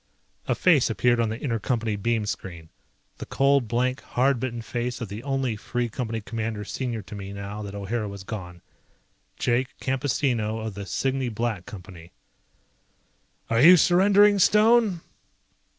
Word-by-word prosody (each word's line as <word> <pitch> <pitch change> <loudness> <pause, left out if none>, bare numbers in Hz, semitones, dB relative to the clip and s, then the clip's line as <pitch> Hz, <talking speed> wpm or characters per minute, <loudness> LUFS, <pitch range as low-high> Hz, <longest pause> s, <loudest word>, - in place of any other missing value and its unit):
A - - +1
face 160 -10 +4
appeared 120 +1 +2
on 115 -2 +1
the 110 +2 -5
inter 115 -5 -1
Company 115 -1 -1
beam 110 +1 -1
screen. 85 -5 -6 0.5
The - - -7
cold, 135 -3 +2
blank, 125 +3 0
hard 130 0 +1
bitten 120 -2 -4
face 120 +1 -3
of 115 -5 -5
the 105 +3 -6
only 135 -3 -1
Free 120 +3 -3
Company 115 -1 -4
Commander 110 -1 -4
senior 120 -2 -4
to 100 - -11
me 100 -1 -7
now 100 +1 -6
that 100 -1 -7
O'Hara 105 +2 -3
was 100 -1 -8
gone, 90 -4 -8 0.7
Jake 125 +2 -1
Campesino 130 -4 -1
of 110 -1 -5
the 100 0 -7
Cygne 135 +1 -1
Black 110 -4 -3
Company. 90 -3 -11 1.4
"Are 115 +1 +2
you 180 +5 +9
surrendering, 200 +4 +5
Stone?" 215 -2 +4
115 Hz, 150 wpm, -25 LUFS, 105-135 Hz, 1.4 s, you